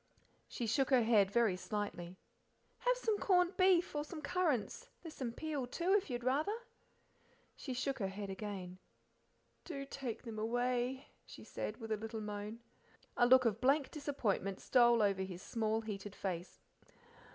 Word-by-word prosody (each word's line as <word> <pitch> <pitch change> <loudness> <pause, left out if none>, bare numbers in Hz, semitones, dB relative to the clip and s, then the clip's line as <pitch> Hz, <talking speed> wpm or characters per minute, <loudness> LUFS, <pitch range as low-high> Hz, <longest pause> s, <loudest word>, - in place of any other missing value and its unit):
She 240 - -4
shook 250 +4 +2
her 255 -3 +5
head 215 -4 +4
very 220 -3 +3
slightly. 185 -3 -4 0.6
"Have - - +2
some 445 -4 0
corned 360 -1 +3
beef, 370 -3 +4
or 295 - 0
some 310 +2 -8
currants; 320 - -1
there's 325 -2 -8
some 255 -5 -3
peel, 290 0 -3
too, 345 +9 0
if 405 -6 +2
you'd 240 -1 -3
rather." 300 - +1 1.0
She 260 -3 -5
shook 265 +1 -1
her 195 - 0
head 195 +1 -5
again. 190 -2 -6 0.8
"Do 275 -5 -5
take 270 -4 -5
them 225 -3 -6
away," 245 +3 0 0.2
she - - -12
said, - - -5
with 225 -2 -7
a 215 - +1
little 220 +1 -5
moan. 210 +2 -5 0.5
A 240 - +4
look 255 0 +7
of 230 0 +1
blank 275 +2 +3
disappointment 240 - -1
stole 240 -3 +5
over 195 -2 +2
his 185 -1 -5
small, 220 -1 0
heated 205 -2 -6
face. 180 -2 -4
240 Hz, 160 wpm, -36 LUFS, 205-285 Hz, 1.0 s, look